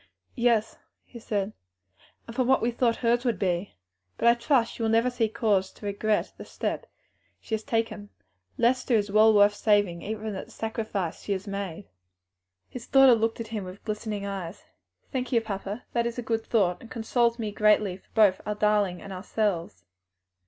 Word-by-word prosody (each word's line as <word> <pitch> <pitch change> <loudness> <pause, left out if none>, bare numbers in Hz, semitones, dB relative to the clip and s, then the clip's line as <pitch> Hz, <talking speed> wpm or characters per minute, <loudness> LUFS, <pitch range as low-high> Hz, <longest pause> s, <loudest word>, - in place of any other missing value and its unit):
"Yes," 235 -3 +1 0.3
he 235 - -12
said, 210 -2 -2 0.7
"and 230 - -10
from 255 -1 +1
what 265 - +4
we 240 - +2
thought 235 -1 +1
hers 240 0 +1
would 240 -4 0
be. 180 0 -1 0.4
But - - +1
I - - +7
trust 235 0 +1
she - - -8
will 225 - +1
never 230 +3 +3
see 230 -3 0
cause 210 -4 +1
to - - -12
regret 205 +1 0
the - - -8
step - - -4 0.5
she - - -8
has 220 - 0
taken. 225 -2 -2 0.5
Lester 250 +1 +2
is 205 -2 +1
worth 210 -1 +6
saving 205 -5 +2
even 215 0 -4
at 190 - -5
the - - -18
sacrifice 220 -6 -3
she 205 - -2
has 190 0 -4
made." 200 -2 -5 0.8
His 245 -2 -9
daughter 270 -2 +7
looked 225 0 0
at 225 -1 -5
him 215 -3 -4
with 185 +1 -10
glistening 210 -1 -3
eyes. 195 -1 -6 0.5
"Thank 255 -2 -3
you, 235 - +4
papa, 205 0 -5
that 235 -1 +1
is 235 - -5
a 245 - -3
good 225 0 -1
thought, 190 -7 +1
and 230 - -12
consoles 235 0 +1
me 220 -3 -3
greatly 210 -3 +3
for - - -29
both 210 -4 +4
our 210 - -3
darling 210 -4 +1
and 195 - -7
ourselves." 185 - -2
215 Hz, 185 wpm, -27 LUFS, 200-235 Hz, 0.8 s, I